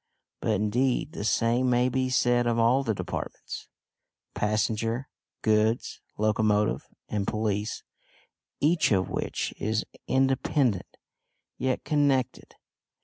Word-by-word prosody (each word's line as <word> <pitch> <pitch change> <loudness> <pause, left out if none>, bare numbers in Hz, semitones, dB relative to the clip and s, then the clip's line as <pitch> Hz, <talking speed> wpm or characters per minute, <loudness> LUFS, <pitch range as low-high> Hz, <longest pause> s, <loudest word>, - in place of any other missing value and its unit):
But 110 - 0
indeed 120 +8 +1
the 165 - -5
same 120 +3 +2
may 125 0 +3
be 130 0 0
said 120 -1 +2
of 115 -1 +1
all 120 +4 +4
the 110 -4 0
departments - - -6 0.7
passenger, 110 +4 0 0.4
goods, 110 +2 +1 0.2
locomotive, 105 0 +1 0.2
and 100 -2 -2
police, 105 0 -1 0.8
each 155 -1 +3
of 95 -2 +2
which - - -2
is 110 +1 0 0.2
independent, 135 -4 +1 0.6
yet 130 -1 0
connected. 140 -4 0
115 Hz, 105 wpm, -27 LUFS, 110-130 Hz, 0.8 s, all